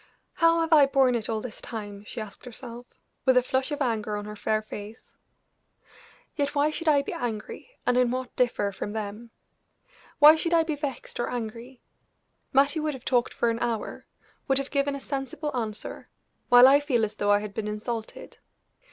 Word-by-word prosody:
"How 330 Hz, 0 st, +3 dB
have 325 Hz, 0 st, +1 dB
I 290 Hz, -3 st, +7 dB
borne 270 Hz, -2 st, +3 dB
it 230 Hz, -3 st, -2 dB
all 220 Hz, -1 st, -1 dB
this 245 Hz, -2 st, -8 dB
time?" 205 Hz, -3 st, -7 dB
she 230 Hz, -, -7 dB
asked 215 Hz, +1 st, -9 dB
herself, 245 Hz, 0 st, -9 dB, 0.4 s
with 260 Hz, -1 st, +4 dB
a 250 Hz, -, +5 dB
flush 260 Hz, +1 st, 0 dB
of 290 Hz, -1 st, -1 dB
anger 215 Hz, -4 st, -1 dB
on 205 Hz, -, -5 dB
her 210 Hz, 0 st, -7 dB
fair 215 Hz, +1 st, -1 dB
face. 215 Hz, +1 st, -10 dB, 1.2 s
"Yet, 285 Hz, -1 st, -1 dB
why 290 Hz, +2 st, +3 dB
should 330 Hz, +2 st, -5 dB
I 285 Hz, -2 st, +4 dB
be -, -, -5 dB
angry, 225 Hz, -, -5 dB, 0.2 s
and 245 Hz, -, +2 dB
in 250 Hz, -1 st, +3 dB
what 255 Hz, 0 st, -4 dB
differ 235 Hz, -5 st, +1 dB
from 205 Hz, +1 st, -5 dB
them? 215 Hz, +2 st, -5 dB, 0.9 s
Why 300 Hz, +1 st, +9 dB
should 335 Hz, +1 st, 0 dB
I 330 Hz, -, +5 dB
be 315 Hz, -2 st, -2 dB
vexed 280 Hz, -5 st, -5 dB
or 240 Hz, -, -1 dB
angry? 240 Hz, +2 st, -6 dB, 0.7 s
Mattie 280 Hz, +3 st, +3 dB
would 305 Hz, -2 st, -1 dB
have 255 Hz, -, -12 dB
talked 245 Hz, -2 st, +2 dB
for 235 Hz, -, +2 dB
an 230 Hz, -, -3 dB
hour 235 Hz, -2 st, -3 dB, 0.4 s
would 270 Hz, -, +2 dB
have 275 Hz, 0 st, -2 dB
given 280 Hz, -1 st, +1 dB
a -, -, -5 dB
sensible 275 Hz, +2 st, -4 dB
answer, 220 Hz, -3 st, -5 dB, 0.4 s
while 245 Hz, +1 st, +9 dB
I 280 Hz, +2 st, +7 dB
feel 255 Hz, -6 st, +1 dB
as 210 Hz, -, -7 dB
though 205 Hz, -, 0 dB
I 205 Hz, -, +6 dB
had 210 Hz, -1 st, -7 dB
been 215 Hz, -1 st, -3 dB
insulted. 220 Hz, +2 st, -6 dB
245 Hz, 195 wpm, -26 LUFS, 220-280 Hz, 1.2 s, Why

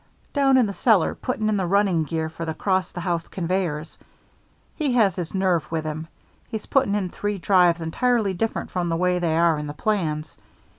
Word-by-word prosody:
"Down 275 Hz, -2 st, +4 dB
in 250 Hz, -, +5 dB
the 200 Hz, -, -3 dB
cellar 210 Hz, -5 st, +3 dB
putting 220 Hz, -4 st, -2 dB
in 215 Hz, -1 st, +1 dB
the 185 Hz, -2 st, -1 dB
running 190 Hz, -4 st, +2 dB
gear 160 Hz, +1 st, -2 dB
for 160 Hz, +1 st, -7 dB
the 160 Hz, -1 st, -3 dB
'cross 190 Hz, -2 st, 0 dB
the 175 Hz, -, -6 dB
house 170 Hz, -2 st, -2 dB
conveyors. 170 Hz, -4 st, -3 dB, 0.8 s
He 290 Hz, -5 st, 0 dB
has 220 Hz, -6 st, +3 dB
his 175 Hz, -1 st, -5 dB
nerve 185 Hz, -4 st, +1 dB
with 160 Hz, -1 st, -2 dB
him. 155 Hz, +1 st, -4 dB, 0.4 s
He's 220 Hz, -1 st, -5 dB
putting 265 Hz, -7 st, +2 dB
in 195 Hz, -3 st, -1 dB
three 205 Hz, +3 st, -3 dB
drives 175 Hz, -2 st, +3 dB
entirely 215 Hz, +5 st, +1 dB
different 225 Hz, +5 st, -2 dB
from 175 Hz, -2 st, -1 dB
the 165 Hz, -, 0 dB
way 180 Hz, 0 st, +1 dB
they 165 Hz, -2 st, 0 dB
are 165 Hz, -2 st, +3 dB
in 150 Hz, -, -5 dB
the 145 Hz, -, -5 dB
plans. 155 Hz, -7 st, -2 dB
180 Hz, 200 wpm, -23 LUFS, 165-205 Hz, 0.8 s, in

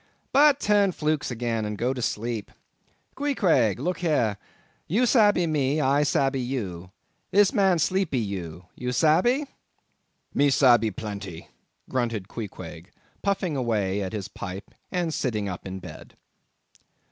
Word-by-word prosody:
—but 285 Hz, +1 st, +6 dB
turn 205 Hz, -2 st, +3 dB
flukes 155 Hz, -3 st, -1 dB
again 115 Hz, -2 st, -2 dB
and 105 Hz, 0 st, -4 dB
go 125 Hz, +4 st, 0 dB
to 125 Hz, -, -5 dB
sleep. 115 Hz, -1 st, -2 dB, 0.6 s
Queequeg, 195 Hz, -, +2 dB
look 175 Hz, +8 st, -2 dB
here—you 155 Hz, -, -1 dB
sabbee 210 Hz, -7 st, +4 dB
me, 150 Hz, -2 st, +1 dB
I 140 Hz, 0 st, +3 dB
sabbee—you 125 Hz, -11 st, -1 dB, 0.4 s
this 205 Hz, 0 st, +4 dB
man 190 Hz, -3 st, +3 dB
sleepe 185 Hz, 0 st, 0 dB
you—you 95 Hz, +1 st, -4 dB
sabbee?" 180 Hz, -, +3 dB, 0.9 s
"Me 145 Hz, 0 st, +3 dB
sabbee 120 Hz, -5 st, +5 dB
plenty"—grunted 105 Hz, +2 st, -5 dB
Queequeg, 90 Hz, -6 st, -8 dB, 0.3 s
puffing 195 Hz, -5 st, 0 dB
away 105 Hz, -6 st, 0 dB
at 95 Hz, +2 st, -4 dB
his 100 Hz, -4 st, -4 dB
pipe 95 Hz, 0 st, -8 dB, 0.2 s
and 175 Hz, -3 st, -1 dB
sitting 110 Hz, -8 st, -1 dB
up 90 Hz, 0 st, -6 dB
in 95 Hz, 0 st, -5 dB
bed. 95 Hz, -, -11 dB
125 Hz, 120 wpm, -25 LUFS, 105-170 Hz, 0.9 s, but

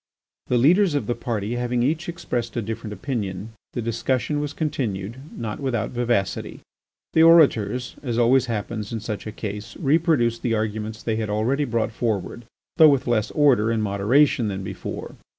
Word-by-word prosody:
The 125 Hz, -, +2 dB
leaders 170 Hz, -, +4 dB
of 145 Hz, -, 0 dB
the 120 Hz, -, 0 dB
party 115 Hz, -1 st, -3 dB
having 120 Hz, 0 st, 0 dB
each 155 Hz, +6 st, -1 dB
expressed 125 Hz, -9 st, -3 dB
a -, -, +1 dB
different 110 Hz, 0 st, -5 dB
opinion, 105 Hz, -2 st, -4 dB, 0.2 s
the 120 Hz, -, -3 dB
discussion 125 Hz, +5 st, -1 dB
was 145 Hz, -1 st, -3 dB
continued, 120 Hz, -, -3 dB, 0.2 s
not 110 Hz, -2 st, -4 dB
without 125 Hz, -6 st, -2 dB
vivacity. 120 Hz, -5 st, -1 dB, 0.5 s
The 160 Hz, -, +5 dB
orators, 135 Hz, -8 st, +4 dB
as 120 Hz, -5 st, -3 dB
always 125 Hz, +2 st, +4 dB
happens 110 Hz, -1 st, -4 dB
in 115 Hz, -, -3 dB
such 110 Hz, -1 st, -5 dB
a -, -, -4 dB
case, 105 Hz, +1 st, -6 dB
reproduced 145 Hz, -7 st, +2 dB
the 115 Hz, -2 st, 0 dB
arguments 110 Hz, 0 st, -3 dB
they 110 Hz, -1 st, -1 dB
had 110 Hz, -2 st, -2 dB
already 120 Hz, +8 st, +1 dB
brought 115 Hz, -3 st, -1 dB
forward, 110 Hz, 0 st, -3 dB, 0.3 s
though 160 Hz, -2 st, +9 dB
with 140 Hz, -3 st, +2 dB
less 115 Hz, -4 st, +1 dB
order 130 Hz, -8 st, +3 dB
and 115 Hz, -1 st, 0 dB
moderation 110 Hz, +5 st, +3 dB
than 95 Hz, -1 st, -4 dB
before. -, -, -6 dB
120 Hz, 170 wpm, -23 LUFS, 110-135 Hz, 0.5 s, though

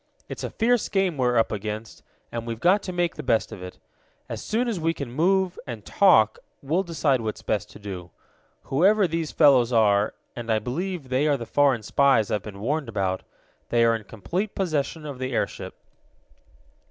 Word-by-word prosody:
"It's -, -, -7 dB
a -, -, -2 dB
fierce 240 Hz, 0 st, +1 dB
game 195 Hz, -4 st, +1 dB
we're 125 Hz, -3 st, +1 dB
up 115 Hz, -, +2 dB
against, 105 Hz, +1 st, -5 dB, 0.3 s
and 115 Hz, 0 st, -5 dB
we've 115 Hz, -1 st, -4 dB
got 185 Hz, -, +4 dB
to 185 Hz, -, -5 dB
make 175 Hz, -1 st, 0 dB
the -, -, -4 dB
best 115 Hz, -4 st, +1 dB
of 105 Hz, -4 st, -8 dB
it. 90 Hz, 0 st, -8 dB, 0.5 s
As -, -, -5 dB
soon 235 Hz, +3 st, -1 dB
as 220 Hz, -6 st, -1 dB
we 165 Hz, +1 st, 0 dB
can 135 Hz, -4 st, -6 dB
move, 185 Hz, +6 st, +1 dB
and 115 Hz, -5 st, -7 dB
talk, 110 Hz, -, +4 dB, 0.2 s
we'll 160 Hz, +7 st, +1 dB
decide 155 Hz, -8 st, 0 dB
what's 110 Hz, -1 st, -4 dB
best 105 Hz, -3 st, -1 dB
to -, -, -12 dB
do. 95 Hz, -4 st, -7 dB, 0.5 s
Whoever 195 Hz, +8 st, +3 dB
these 165 Hz, -1 st, -2 dB
fellows 130 Hz, -6 st, +5 dB
are, 105 Hz, -3 st, +3 dB, 0.2 s
and 120 Hz, -1 st, -4 dB
I 110 Hz, -, +3 dB
believe 145 Hz, -, -4 dB
they 130 Hz, +4 st, +2 dB
are 145 Hz, -2 st, +2 dB
the 120 Hz, -, -6 dB
foreign 135 Hz, -3 st, +2 dB
spies 135 Hz, -2 st, +3 dB
I've 105 Hz, -, 0 dB
been 100 Hz, 0 st, -9 dB
warned 140 Hz, +3 st, -1 dB
about, 95 Hz, -3 st, -1 dB, 0.5 s
they 120 Hz, -1 st, +3 dB
are 115 Hz, 0 st, +4 dB
in 110 Hz, -2 st, -6 dB
complete 175 Hz, -, -4 dB
possession 155 Hz, -4 st, -2 dB
of 140 Hz, -4 st, -7 dB
the 130 Hz, 0 st, -3 dB
airship." -, -, -3 dB
130 Hz, 190 wpm, -25 LUFS, 110-170 Hz, 0.5 s, fellows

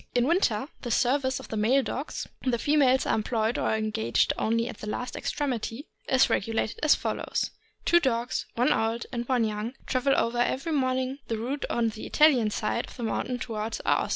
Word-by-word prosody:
In 245 Hz, 0 st, +3 dB
winter 270 Hz, -, +2 dB
the 240 Hz, -, -5 dB
service 260 Hz, +3 st, +1 dB
of -, -, -11 dB
the 220 Hz, -, -3 dB
male 250 Hz, +6 st, +3 dB
dogs 275 Hz, +4 st, -4 dB, 0.2 s
(the 255 Hz, -2 st, +1 dB
females 265 Hz, -1 st, +3 dB
are -, -, +1 dB
employed 220 Hz, +1 st, 0 dB
or -, -, +1 dB
engaged 220 Hz, 0 st, +1 dB
only 230 Hz, +1 st, 0 dB
at 220 Hz, -, -7 dB
the 210 Hz, -, -5 dB
last 245 Hz, +4 st, -4 dB
extremity) 270 Hz, -1 st, -3 dB, 0.2 s
is 260 Hz, -1 st, +5 dB
regulated 225 Hz, +1 st, -1 dB
as 305 Hz, -1 st, +5 dB
follows: -, -, -2 dB, 0.3 s
Two 345 Hz, -, +6 dB
dogs, 245 Hz, -4 st, -1 dB
one 245 Hz, +2 st, +3 dB
old 225 Hz, +1 st, -1 dB
and 240 Hz, -2 st, -3 dB
one 250 Hz, -3 st, +3 dB
young, 215 Hz, +2 st, -2 dB
travel 265 Hz, +1 st, +2 dB
over 235 Hz, +1 st, +1 dB
every 270 Hz, +6 st, 0 dB
morning 260 Hz, -1 st, 0 dB
the 225 Hz, -, -2 dB
route 255 Hz, +6 st, -3 dB
on 235 Hz, -1 st, +1 dB
the 215 Hz, 0 st, -7 dB
Italian 270 Hz, -8 st, +4 dB
side 215 Hz, +2 st, -2 dB
of -, -, -13 dB
the 240 Hz, -, -5 dB
mountain 250 Hz, +2 st, -1 dB
toward 225 Hz, -2 st, -4 dB
Aosta. -, -, +2 dB
245 Hz, 190 wpm, -27 LUFS, 225-265 Hz, 0.3 s, Two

